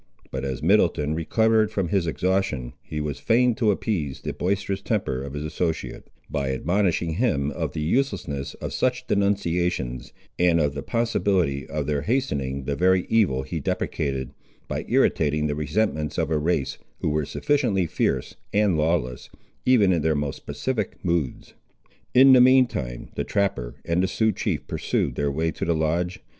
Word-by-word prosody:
But 65 0 -4
as 65 +1 -4
Middleton 85 -5 +3
recovered 110 +6 +2
from 95 -5 -2
his 95 -4 +1
exhaustion 80 -8 -1
he 75 - -5
was 75 -2 -3
fain 125 +1 +3
to 110 -1 +1
appease 90 - -1
the - - -4
boisterous 100 +1 -1
temper 65 0 -1
of 70 0 -6
his 75 +1 -4
associate, 80 +1 -3 0.2
by 70 -2 -2
admonishing 85 +3 0
him 75 - +1
of - - -3
the 75 - -3
uselessness 75 - -1
of - - -6
such - - 0
denunciations, 90 -10 0 0.3
and 85 -1 +4
of 75 -2 +1
the 70 - -4
possibility 95 - 0
of 75 0 -3
their 75 -1 0
hastening 70 - -1
the 70 +2 -2
very 90 +2 +3
evil 95 -13 +2
he - - -4
deprecated, 65 -4 -2 0.4
by - - -3
irritating 75 0 +2
the 75 - 0
resentments 75 0 -1
of 80 -2 0
a 75 - +2
race, 75 -4 -1 0.2
who - - +1
were 75 0 0
sufficiently 120 - +1
fierce 80 - -1 0.2
and 100 -6 +2
lawless, 75 -6 -1 0.4
even 105 -7 +5
in 85 - +1
their 80 0 +1
most 70 -2 -4
pacific 115 -7 -2
moods. 85 -7 -2 0.6
In 130 +1 +8
the 125 - +8
mean 130 +1 +7
time - - -5
the - - -2
trapper 95 -12 -1
and 85 +2 +1
the 95 - +2
Sioux 110 +3 +1
chief - - -2
pursued - - -1
their 70 0 0
way 80 +3 0
to - - -6
the 85 - +1
lodge. 85 +3 -1
80 Hz, 170 wpm, -24 LUFS, 70-100 Hz, 0.6 s, In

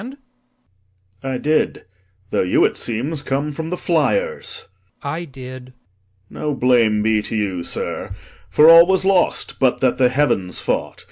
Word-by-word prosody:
I 135 -1 -2
did: 155 +4 0 0.5
Though - - +1
you, 90 - +3
it - - 0
seems, 135 +7 -2
come 145 +2 -2
from 160 +2 -5
the 180 - -2
fliers. 470 - -1 0.4
LORD. 140 0 -3
I 170 +2 -5
did. 130 -2 -11 0.6
POSTHUMUS. - - -9
No 150 -2 -1
blame 115 -4 +2
be 110 -1 +2
to 105 - -5
you, 100 -5 -2
sir, - - -4 0.4
for 150 - +5
all 165 +1 +9
was 190 0 +1
lost, 190 -2 +1
But 130 -2 +2
that 130 -1 +1
the 125 -1 +4
heavens 125 -10 0
fought. - - -3
135 Hz, 155 wpm, -19 LUFS, 120-160 Hz, 0.6 s, all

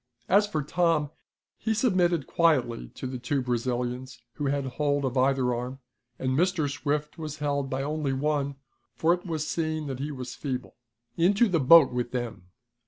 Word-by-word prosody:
As 205 +3 +4
for 155 -7 -2
Tom, 155 -1 +1 0.5
he 220 +1 0
submitted 180 - +2
quietly 130 -9 +1
to - - -6
the 130 -1 -4
two 130 +3 -1
Brazilians 125 +1 -2
who 145 -2 -3
had 140 0 0
hold 145 +2 0
of 130 0 -2
either 130 -1 +2
arm, 125 +2 -4 0.4
and 130 - -1
Mr. 165 +2 +2
Swift 150 +3 -2
was 155 -1 -5
held 140 -2 -1
by 135 +1 -2
only 150 -1 -1
one, 140 0 0 0.4
for 165 +2 +3
it 180 +1 -5
was 155 -2 -2
seen 155 -2 -2
that 135 -3 -5
he 145 +2 -3
was 130 -3 -6
feeble. 130 -3 -5 0.4
"Into 200 +7 +4
the 175 -5 +1
boat 145 +1 +7
with 125 0 -2
them!" 120 -7 -4
145 Hz, 170 wpm, -27 LUFS, 130-160 Hz, 0.5 s, boat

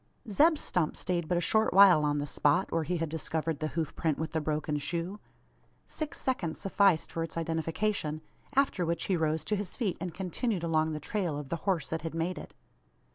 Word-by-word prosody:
Zeb 310 - +5
Stump 175 - -1
stayed 175 -3 -1
but 175 - +1
a - - +1
short 220 0 +3
while 190 -6 +8
on 145 0 +1
the 145 - -1
spot, 150 +5 +1
where 165 - +1
he 175 +3 -1
had 165 0 -1
discovered 160 0 -2
the 155 - -1
hoof 160 -3 -1
print 155 -3 0
with 160 +1 -3
the 160 - -1
broken 150 0 -1
shoe. 170 +7 -3 0.7
Six 310 -1 -5
seconds 185 -12 -2
sufficed 195 -4 +2
for 165 - -3
its 165 0 -4
identification; 165 0 -1 0.3
after 270 -9 +2
which 170 -1 -1
he 190 - +1
rose 160 -1 0
to 210 - 0
his 205 -3 -4
feet, 210 -8 -1
and 180 -2 -3
continued 185 +2 -2
along 160 -1 +1
the 155 - -3
trail 170 0 -2
of 145 -2 -6
the - - -1
horse 170 -7 0
that 160 - -2
had 165 0 -5
made 170 +2 -1
it. - - -11
165 Hz, 210 wpm, -30 LUFS, 155-190 Hz, 0.7 s, while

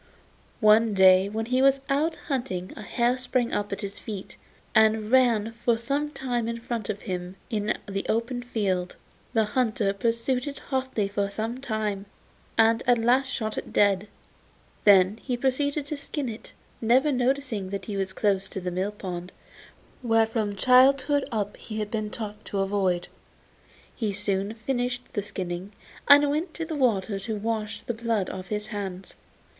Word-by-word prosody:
One 215 0 +5
day 190 0 +6
when 220 +2 -3
he 255 +2 +1
was 275 0 +4
out 300 +4 +1
hunting 245 - -3
a - - -8
hare 240 +4 0
sprang 250 -1 0
up 205 0 -1
at 200 - -4
his 200 -1 -6
feet, 200 -4 -7 0.4
and 220 0 +3
ran 235 -4 +4
for 235 0 0
some 280 +6 -1
way 245 -2 +1
in 230 0 -2
front 230 -3 -4
of 205 -1 -3
him 180 -2 -4 0.2
in 215 -1 0
the 195 -1 -3
open 235 +2 0
field. 195 -7 -1 0.4
The 225 -2 +4
hunter 215 -3 0
pursued 235 +5 0
it 280 - -5
hotly 260 -6 -2
for 200 0 -1
some 220 +5 -3
time, 215 -5 -2 0.5
and 225 +1 +4
at 245 -1 +5
last 245 +4 +3
shot 220 -5 -2
it - - -10
dead. 200 0 +3 0.8
Then 200 +1 +6
he 250 -2 -2
proceeded 280 +3 0
to 295 +1 -4
skin 280 -1 -3
it, 220 0 -9 0.3
never 255 +6 +4
noticing 255 -6 0
that 195 -1 -4
he 205 - -4
was 195 -1 -1
close 195 0 0
to - - -5
the 180 -1 -3
mill 190 +4 -2
pond, 180 -3 -6 0.7
which 225 -2 +3
from 215 -3 -1
childhood 265 +5 +4
up 210 -3 -2
he 215 - -7
had 210 -1 -3
been 215 -2 -2
taught 210 -1 -5
to 200 - -4
avoid. 190 -3 0 0.9
He 215 -4 -1
soon 200 +1 -2
finished 245 +1 -3
the 205 - 0
skinning, 185 0 -5 0.3
and 290 +1 +8
went 320 +3 -2
to 330 - -3
the 320 -1 -4
water 220 -7 +1
to 220 +3 -3
wash 215 0 -3
the 240 - -3
blood 225 -4 -1
off 185 0 -7
his 210 0 -3
hands. 195 -3 -5
220 Hz, 170 wpm, -26 LUFS, 200-250 Hz, 0.9 s, and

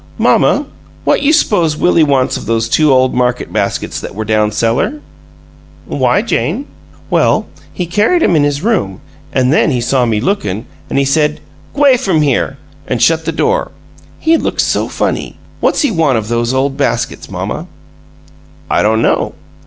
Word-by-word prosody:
"Mamma, - - +3 0.4
what - - +2
you 285 +1 +3
s'pose 175 - +2
Willie 170 0 +3
wants 135 -3 +1
of - - -6
those 115 0 0
two 155 +4 +3
ole 130 0 +4
market 125 -1 -1
baskets 100 -2 -2
that - - -8
were 110 +1 -4
down 105 0 +1
cellar?" 115 - 0 0.9
"Why, - - +1
Jane?" 280 - -1 0.5
"Well, - - +2 0.3
he 180 - -3
carried 210 - +2
'em 180 - +3
in 150 - +3
his 145 +1 -1
room, 185 - 0 0.3
an' 130 0 +1
then 155 - +3
he 130 -4 0
saw 125 +1 +1
me 110 -2 0
lookin'; 110 - -2 0.2
an' - - -2
he 140 - +2
said, 150 +2 +1 0.4
'G'way 280 -3 +5
from 165 -8 +1
here!' 135 -1 0 0.3
an' 125 - -1
shut 160 +8 +2
the 165 - 0
door. 465 - 0 0.5
He 325 +1 +2
looks - - -1
so - - 0
funny! - - -3 0.2
What's - - +1
he 290 - +2
want 160 - +2
of 110 -1 -4
those 120 0 0
ole 135 +1 +1
baskets, 140 +1 -2
mamma?" - - -4 1.0
"I - - +3
don't 110 +2 +2
know. - - 0
140 Hz, 170 wpm, -14 LUFS, 120-175 Hz, 1.0 s, G'way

